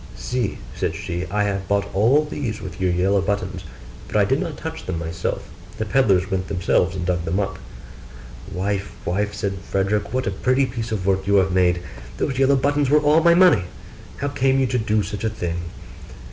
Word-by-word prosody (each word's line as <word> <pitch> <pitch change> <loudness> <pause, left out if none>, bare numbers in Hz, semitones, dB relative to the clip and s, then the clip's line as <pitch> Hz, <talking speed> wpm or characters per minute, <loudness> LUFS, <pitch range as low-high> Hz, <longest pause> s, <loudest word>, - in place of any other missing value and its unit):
'See,' 125 -4 -2 0.2
said - - -2
she, 90 -2 -4
'I 105 +2 +1
have 95 -2 -2
bought 100 +1 +1
all 125 +10 +4
these 130 -7 -4
with 95 -1 -8
your 95 - +2
yellow 95 +3 +2
buttons: 95 -2 -2 0.4
but - - -8
I - - +5
did - - +1
not - - -4
touch - - -6
them 95 -3 -2
myself; 80 0 -3 0.3
the 110 - -2
pedlars 100 -5 +2
went 95 -1 -1
themselves 90 -2 +1
and 90 -2 -3
dug 90 -1 0
them 85 +4 -1
up.' 100 - -2 0.9
'Wife, 100 +1 -2
wife,' 105 +4 -1
said 100 -2 -3
Frederick, 100 +2 -1
'what 130 +1 -1
a 100 - 0
pretty 130 +7 +2
piece 115 -3 -5
of 100 -4 -2
work 95 0 +1
you 100 - +3
have 95 -1 +4
made! 90 -1 +2 0.3
those 130 -1 -1
yellow 135 +1 +5
buttons 145 +1 +1
were 150 - +6
all 150 +2 +4
my 170 +1 +5
money: 175 - +5 0.5
how 145 - -2
came 135 -1 +2
you 135 - +3
to 125 0 0
do 110 -1 +1
such 100 +1 -5
a 110 - +1
thing? 85 -5 -4
100 Hz, 200 wpm, -22 LUFS, 95-125 Hz, 0.9 s, were